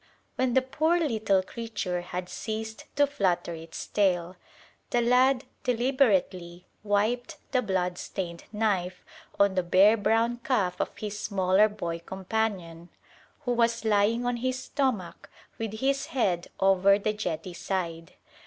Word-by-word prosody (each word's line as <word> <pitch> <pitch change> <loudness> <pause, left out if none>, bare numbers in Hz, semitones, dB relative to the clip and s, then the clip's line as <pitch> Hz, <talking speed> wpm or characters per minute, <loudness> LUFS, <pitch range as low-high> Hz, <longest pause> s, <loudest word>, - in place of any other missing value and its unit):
When 255 -2 0
the 260 - +4
poor 315 +6 +1
little 220 - +1
creature 210 -5 -4
had 180 0 -5
ceased 220 +2 -5
to 290 - +5
flutter 190 -11 0
its 165 0 -7
tail, 180 -3 +1 0.5
the 240 - +2
lad 250 +2 +4 0.2
deliberately 205 -9 +1 0.2
wiped 215 +4 0
the 255 - +2
bloodstained 180 -3 -3
knife 195 -4 -1 0.3
on 200 -1 +4
the 185 - +1
bare 190 +5 +5
brown 225 +3 +1
calf 215 -7 0
of - - -4
his 210 -1 -5
smaller 200 0 +3
boy 170 -5 -4
companion, 185 -2 -3 0.5
who 245 -4 -1
was 235 -1 +1
lying 220 +3 +2
on 245 0 0
his 255 +2 -1
stomach 255 -9 -2 0.3
with 225 -2 -3
his 275 0 +1
head 185 -9 0
over 195 +1 +5
the 210 +1 -1
jetty 180 -4 -4
side. 170 -2 -4
205 Hz, 135 wpm, -27 LUFS, 180-240 Hz, 0.5 s, to